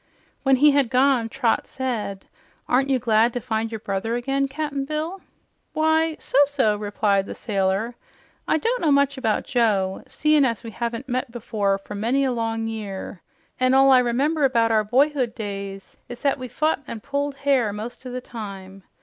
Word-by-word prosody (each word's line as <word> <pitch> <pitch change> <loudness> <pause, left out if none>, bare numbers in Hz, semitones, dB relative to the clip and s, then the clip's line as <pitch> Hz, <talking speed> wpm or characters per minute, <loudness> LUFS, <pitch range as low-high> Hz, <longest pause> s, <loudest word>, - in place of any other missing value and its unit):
When 270 -1 +4
he 290 +3 +6
had 280 -4 +2
gone, 255 -2 +3
Trot 245 -2 0
said, 225 -7 -4 0.4
"Aren't 270 +2 +2
you 265 - +3
glad 230 -1 +2
to 245 - -2
find 225 -2 -2
your 225 - -3
brother 205 +3 -2
again, 275 +3 0
Cap'n 280 0 -3
Bill?" 310 +6 -4 0.5
"Why, 315 +1 +2
so 270 - +1
so," 265 -7 +1
replied 205 -1 0
the - - -6
sailor. 195 +2 -1 0.5
"I - - +3
don't 475 +10 -1
know 310 - +3
much 280 0 +3
about 220 -5 0
Joe, 210 -7 +1
seein' 305 -1 +3
as 230 -6 0
we 230 - -7
haven't 235 +3 -4
met 255 +1 -2
before 210 -4 -1
for 195 +1 -10
many 235 +7 +1
a 265 - +1
long 225 -1 -2
year, 205 -4 -6 0.4
an' 255 0 +3
all 270 0 +6
I 260 - +7
remember 275 +6 +1
about 230 -4 +3
our 215 -1 +3
boyhood 255 +1 +1
days 200 -2 -6
is 245 -1 -9
that 280 -1 +1
we 255 - -5
fit 310 +6 0
an' 220 - -6
pulled 280 +1 -2
hair 275 -6 +1
most 220 +5 -7
o' 255 - -7
the 250 0 -4
time. 195 -5 -8
245 Hz, 185 wpm, -23 LUFS, 215-275 Hz, 0.5 s, I